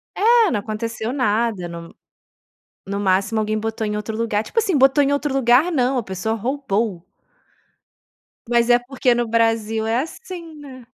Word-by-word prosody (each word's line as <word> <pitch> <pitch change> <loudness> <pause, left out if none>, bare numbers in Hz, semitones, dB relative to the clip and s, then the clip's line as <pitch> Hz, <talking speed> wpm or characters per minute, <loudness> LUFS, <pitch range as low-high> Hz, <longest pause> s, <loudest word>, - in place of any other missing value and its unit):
É, 455 0 +4
não 210 - 0
aconteceu 220 +2 -4
nada. 220 -7 0
No 170 0 -9 0.9
no 200 +1 -3
máximo 200 +3 +1
alguém 215 0 -1
botou 220 0 -3
em 210 0 -2
outro 215 +1 -5
lugar, 225 -2 0
tipo, 460 - -4
assim, 425 -5 +1
botou 270 +2 +4
em 280 - +1
outro 285 +1 -1
lugar 265 +5 +4
não, 260 -4 +1
a - - -1
pessoa 190 +2 -3
roubou. 225 -6 -2 1.4
Mas 235 0 +2
é 240 - +6
porque 250 0 0
no 240 -1 -1
Brasil 225 -1 +1
é 225 +2 +1
assim, 335 - -8
né? 265 -4 -12
230 Hz, 165 wpm, -21 LUFS, 215-270 Hz, 1.4 s, é